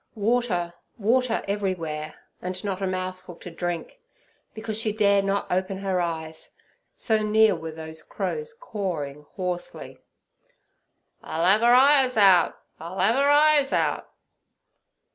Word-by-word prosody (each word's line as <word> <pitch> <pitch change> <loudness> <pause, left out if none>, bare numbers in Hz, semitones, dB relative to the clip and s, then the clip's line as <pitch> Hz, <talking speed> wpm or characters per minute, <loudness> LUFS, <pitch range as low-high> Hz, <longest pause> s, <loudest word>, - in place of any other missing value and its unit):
Water, 210 -6 0 0.2
water, 235 +2 +1
everywhere 185 -7 -2
water, - - -13 0.3
and 185 0 -5
not 195 -2 -3
a 195 - 0
mouthful 185 -1 -5
to 175 - -10
drink, 175 - -5 0.6
because 220 0 -4
she 220 -1 0
dare 200 -2 +3
not 195 0 -1
open 185 +1 -1
her 190 -2 -1
eyes, 160 -2 -5 0.4
so 220 -2 +1
near 215 -1 +4
were 160 -1 -6
those 160 0 -7
crows' 460 - -5
cawing 155 - -5
hoarsely, 180 -2 -5 1.2
'I'll 165 - -3
'ave 205 +5 +4
'er 240 +1 +6
eyes 265 -2 +5
out! 190 -5 +5 0.2
I'll 170 +4 -8
'ave 220 +8 +3
'er 280 +1 +3
eyes 295 -1 +4
out!' - - 0
195 Hz, 135 wpm, -25 LUFS, 175-225 Hz, 1.2 s, er